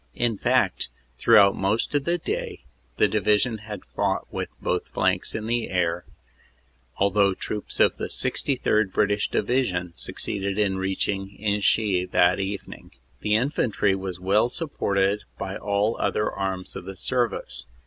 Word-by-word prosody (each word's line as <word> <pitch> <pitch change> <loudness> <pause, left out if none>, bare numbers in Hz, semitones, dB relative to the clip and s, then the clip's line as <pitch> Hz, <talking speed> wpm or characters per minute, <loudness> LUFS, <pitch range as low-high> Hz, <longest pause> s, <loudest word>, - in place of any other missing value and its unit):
In 120 -2 +1
fact, - - +1 0.3
throughout 100 +7 +6
most 100 +8 0
of 145 -1 +1
the 170 +1 +1
day 165 - -4 0.3
the - - +5
Division 105 +2 +1 0.3
fought - - 0
with - - -3
both - - -1
flanks - - 0
in 110 - -3
the 120 0 -1
air, 85 -1 0 0.9
although 100 -1 +3
troops 105 +2 -4
of - - +4
the - - -3
63rd. 110 -7 +1
British 100 +1 +1
Division 90 -9 0
succeeded 100 -1 -3
in 100 -3 +1
reaching 95 +1 -2
Inchy 100 -2 +1
that 90 +1 +3
evening. 100 +1 -5 0.3
"The 105 0 +1
Infantry 115 -5 +1
was 95 -2 -4
well 100 +6 +2
supported 100 - 0 0.2
by 95 0 -4
all 100 +2 +1
the - - -11
other 105 - 0
arms 95 -1 -3
of - - -7
the 95 0 -8
service. 120 +1 -1
100 Hz, 140 wpm, -25 LUFS, 95-110 Hz, 0.9 s, throughout